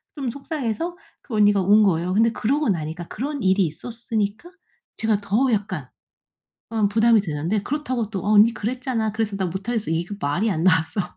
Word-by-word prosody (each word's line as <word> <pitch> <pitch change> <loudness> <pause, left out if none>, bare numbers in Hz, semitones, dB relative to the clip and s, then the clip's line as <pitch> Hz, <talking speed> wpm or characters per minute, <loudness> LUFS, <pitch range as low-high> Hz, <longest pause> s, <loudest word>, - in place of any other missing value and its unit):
좀 270 -6 -3
속상해서 300 +3 -4 0.2
그 240 - -7
언니가 205 -1 +4
운 205 +3 +5
거예요. 180 -2 +1
근데 225 +2 +4
그러고 280 +7 0
나니까 165 -1 -3
그런 280 +2 -4
일이 190 0 +3
있었으니까 225 - -4 0.5
제가 220 -2 +1
더 215 +7 +1
약간 205 -1 -2 0.8
어 220 -3 +1
부담이 225 +1 +4
되는데 170 +4 -2
그렇다고 255 -4 -2
또 195 -4 -4
"어 210 - +1
언니 215 +2 +7
그랬잖아. 230 0 -2
그래서 220 -2 -2
난 185 -3 -1
못 190 +4 -6
하겠어." 225 -8 -1
이거 175 +5 -2
말이 175 +10 0
안 165 -3 -1
나와서 165 +1 +2
215 Hz, 375 characters per minute, -23 LUFS, 190-235 Hz, 0.8 s, 언니